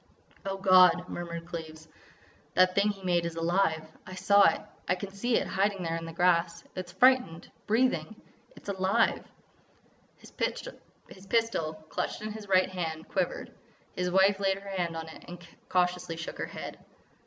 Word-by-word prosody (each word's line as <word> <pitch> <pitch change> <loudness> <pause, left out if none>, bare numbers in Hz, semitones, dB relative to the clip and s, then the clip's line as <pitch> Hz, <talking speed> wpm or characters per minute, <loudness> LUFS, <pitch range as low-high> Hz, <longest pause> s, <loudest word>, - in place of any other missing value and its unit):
"Oh, 195 0 -2
God!" 185 -2 +6
murmured 170 -1 -5
Cleves, 160 -2 -8 0.7
"that 185 0 +5
thing 200 +2 +3
he 195 -2 -5
made 175 -2 +2
is 170 -1 -4
alive! 165 -1 +1 0.2
I 185 - -8
saw 200 -1 +5
it. - - -5 0.3
I - - +3
can 195 +1 -7
see 230 +5 0
it - - 0
hiding 195 0 0
there 165 -1 -2
in 165 0 -5
the 165 - -7
grass. 170 0 +1
It's 185 -1 -6
frightened—breathing! 220 -2 +1 0.4
It's - - -15
alive!" 190 -1 +1 0.9
His - - -16
pistol, 200 - -3 0.2
clutched - - -3
in 215 - -4
his 210 -1 -8
right 185 -1 +4
hand, 160 -3 -4
quivered. 185 -2 -2 0.4
His 180 0 -1
wife 190 +2 +4
laid 195 -1 +1
her 200 0 -10
hand 175 -3 -2
on 160 0 -6
it 160 - -12
and 175 -1 -10 0.2
cautiously 180 -2 0
shook 165 - -7
her - - -2
head. - - -8
185 Hz, 160 wpm, -29 LUFS, 170-195 Hz, 0.9 s, God